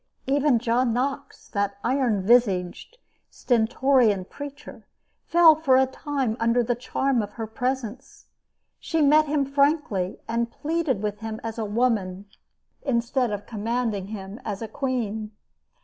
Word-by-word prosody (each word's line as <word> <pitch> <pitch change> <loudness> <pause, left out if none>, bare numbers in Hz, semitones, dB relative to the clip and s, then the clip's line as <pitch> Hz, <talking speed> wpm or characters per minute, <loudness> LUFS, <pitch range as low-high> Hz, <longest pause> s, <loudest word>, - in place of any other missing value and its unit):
Even 280 -1 +3
John 235 +1 +1
Knox, 265 +3 -3
that 200 -1 -2
iron 240 -6 +1
visaged, 205 - +1 0.3
stentorian 240 -3 +2
preacher, 285 +6 -10 0.4
fell 335 -1 +7
for 295 -4 +3
a 265 - +5
time 265 -3 -2
under 230 +1 +2
the 245 +1 0
charm 250 +1 0
of 205 -1 -6
her 225 - -5
presence. 250 +2 -4 0.5
She 325 - -2
met 305 +2 +5
him 290 -1 +1
frankly 280 - +1
and 235 +1 -1
pleaded 305 -8 -2
with 210 -1 -3
him 220 0 -5
as 225 0 -5
a 220 - -1
woman, 205 -4 0 0.6
instead 245 -1 0
of 205 -1 -4
commanding 225 -2 -2
him 200 +2 -8
as 205 0 -4
a - - -4
queen. 220 -3 -3
235 Hz, 135 wpm, -25 LUFS, 215-270 Hz, 0.6 s, fell